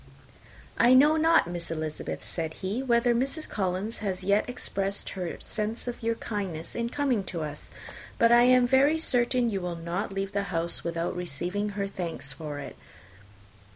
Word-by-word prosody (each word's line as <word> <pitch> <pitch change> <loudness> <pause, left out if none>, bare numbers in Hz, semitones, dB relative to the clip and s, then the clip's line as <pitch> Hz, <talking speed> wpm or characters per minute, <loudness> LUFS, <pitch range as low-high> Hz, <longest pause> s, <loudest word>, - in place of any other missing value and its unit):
"I 245 +2 +7
know 295 +4 +6
not, 325 +1 +4
Miss 175 -1 -5
Elizabeth," 155 -2 -4
said 160 -2 -4
he, 205 +7 -1
"whether 240 -2 +3
Mrs. 275 +6 -1
Collins 195 +2 -2
has 190 -3 -3
yet 200 +5 +2
expressed 200 -5 -2
her 180 -3 -4
sense 220 +3 -2
of 245 - -4
your 230 0 0
kindness 190 -8 -4
in 235 0 -2
coming 265 -6 0
to 170 -2 -4
us; 150 -1 -6 0.5
but 230 0 +5
I 240 0 +7
am 250 0 +6
very 270 +5 +4
certain 245 -5 +2
you 195 -2 -2
will 175 -1 -3
not 170 +5 -3
leave 195 0 -3
the 200 0 -1
house 170 -1 -2
without 170 0 -2
receiving 180 +4 -2
her 200 -1 0
thanks 165 -8 -5
for 150 0 -6
it. 145 - -7
200 Hz, 170 wpm, -28 LUFS, 175-240 Hz, 0.5 s, I